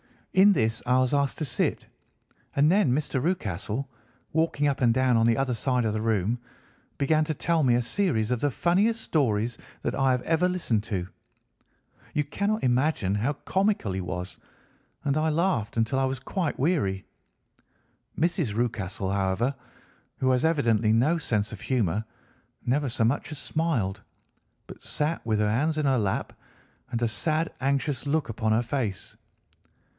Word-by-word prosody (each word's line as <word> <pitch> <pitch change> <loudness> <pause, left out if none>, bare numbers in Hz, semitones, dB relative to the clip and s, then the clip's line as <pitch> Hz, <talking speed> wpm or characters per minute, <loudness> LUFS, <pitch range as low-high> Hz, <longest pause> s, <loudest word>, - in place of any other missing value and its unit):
In 200 +2 +7
this 115 -7 0
I 125 +1 +3
was 130 +1 +1
asked 140 -1 +1
to 155 - -1
sit, 125 -2 -1 0.7
and 145 +3 +4
then 195 -9 +3
Mr. 135 -2 -1
Rucastle, 120 - -2 0.5
walking 160 -2 +1
up 140 -2 +1
and 120 -2 +4
down 130 0 +3
on 115 0 +4
the 115 -1 +3
other 135 -2 0
side 125 +1 0
of 110 - 0
the 110 - -2
room, 110 +1 0 0.6
began 155 +2 +2
to 155 - -1
tell 165 +3 +1
me 125 -4 +4
a 120 - +1
series 115 - 0
of 125 - +1
the 145 - +1
funniest 200 - +1
stories 120 - 0 0.2
that - - -1
I 135 -1 +2
have 125 -1 +1
ever 165 +2 +2
listened 125 - 0
to. 90 -4 -3 1.1
You 150 - +2
cannot 200 +9 -1
imagine 125 -5 +1
how 120 +8 0
comical 190 - 0
he 95 0 -2
was, 90 +1 -5 0.7
and 140 0 +1
I 155 +1 +2
laughed 155 - 0
until 115 +4 +1
I 135 - +2
was 130 0 -1
quite 165 +4 -2
weary. 130 - 0 1.1
Mrs. 165 - 0
Rucastle, 105 -5 -2
however, 100 +6 0 0.6
who 130 0 +2
has 130 +3 +2
evidently 115 -9 +2
no 140 +10 +3
sense 105 -8 -1
of 110 - -8
humour, 110 -5 0 0.6
never 140 +4 +1
so 115 - 0
much 130 +6 0
as 150 - -6
smiled, 135 - -1 0.6
but - - -12
sat 150 +2 -1
with 110 -2 +1
her 105 0 +2
hands 155 +7 +1
in 155 - 0
her 135 -3 +3
lap, 100 -3 -1 0.6
and 120 -2 -2
a - - +3
sad, 155 +9 0
anxious 140 0 -1
look 155 -1 0
upon 110 0 -1
her 115 +2 +2
face. 115 -6 -3
130 Hz, 170 wpm, -27 LUFS, 110-155 Hz, 1.1 s, In